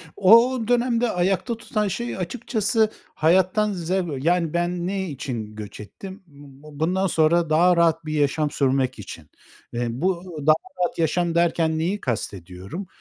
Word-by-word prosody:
O 230 +6 +5
dönemde 245 -1 +2
ayakta 190 +6 0
tutan 215 -2 -2
şey 235 +5 -4
açıkçası 220 +2 0 0.3
hayattan 185 +6 +2
zev 175 -5 -2
Yani, 170 -2 +1
ben 175 0 -1
ne 190 -2 -2
için 120 -6 -6
göç 105 -1 -8
ettim? 190 - -10
B 140 -3 -21 0.3
bu 150 -1 -12
bundan 185 +4 +1
sonra 165 0 +2
daha 175 +3 +4
rahat 165 -1 +2
bir 155 - -4
yaşam 150 0 +1
sürmek 130 -4 0
için. 80 -6 -10 0.4
Eee, 120 0 -1
bu 175 +8 -1 0.2
daha 155 - +7 0.3
rahat 175 - -2
yaşam 170 +1 0
derken 165 -2 +2
neyi 190 +6 -1
kastediyorum? 100 - -5
170 Hz, 150 wpm, -23 LUFS, 150-190 Hz, 0.4 s, daha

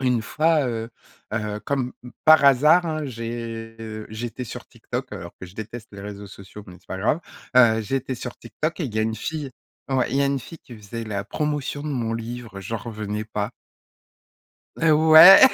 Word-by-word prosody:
Une 125 -3 +2
fois, 155 +4 +2
heu, 115 -1 -3 0.4
heu, 105 -1 -2
comme 130 -1 -2 0.3
par 155 -2 +7
hasard, 150 +6 +6
hein, 155 -1 -2
j'ai 115 -2 -6
j'étais 120 +3 -5
sur 115 - -8
TikTok, - - -6
alors 85 +1 -7
que 95 - -7
je 90 - -15
déteste 110 +2 -7
les 100 - -9
réseaux 100 0 -7
sociaux, 100 +1 -11
mais 90 - -11
c'est - - -30
pas 95 - -4
grave. 115 - +1 0.4
Heu, 115 -3 +6
j'étais 130 +4 -2
sur 120 0 -7
TikTok 155 +8 -4
et - - 0
il 115 - -5
y - - 0
a 110 - +3
une 110 0 -1
fille 150 -1 -4 0.4
ouais, 130 -1 +1
il 135 - 0
y 140 - +3
a - - +3
une 140 -1 0
fille 165 - -11
qui 120 -4 -13
faisait 110 +2 -7
la 100 -2 -3
promotion 150 +1 -2
de 155 - -4
mon 120 -6 -1
livre, 115 -2 -6
j'en 110 +4 -4
revenais 105 -1 -4
pas. 105 0 -3 1.3
Eh 165 -1 +3
ouais! 160 +5 +10
115 Hz, 195 wpm, -24 LUFS, 110-140 Hz, 1.3 s, ouais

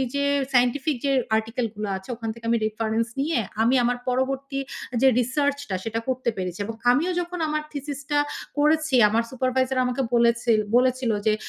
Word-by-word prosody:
যে 280 0 +1 0.3
সায়েন্টিফিক 260 +4 +2
যে 280 - +2 0.2
আর্টিকেল 225 +2 -1
গুলা 210 0 -4
আছে 190 +4 -14
ওখান 225 -1 -5
থেকে 230 0 -13
আমি 235 - +3
রেফারেন্স 220 +1 -1
নিয়ে 295 -2 +1 0.2
আমি 235 +4 +4
আমার 245 +1 +1
পরবর্তী 270 +2 -1 0.4
যে 270 - +6
রিসার্চ 280 +4 +1
টা 190 - -1
সেটা 225 0 -2
করতে 255 -2 0
পেরেছি। 180 0 -4
এবং 225 +2 -5 0.2
আমিও 315 +9 +1
যখন 350 0 -6
আমার 305 0 -1
থিসিস 285 -1 -5
টা 290 0 +3 0.4
করেছি 305 -1 +2
আমার 225 +2 +1
সুপারভাইজার 260 0 0
আমাকে 250 +2 -1
বলেছেল 235 -1 +3 0.2
বলেছিলো 250 -2 +2
যে, 215 - +4
250 Hz, 170 wpm, -24 LUFS, 230-280 Hz, 0.4 s, যে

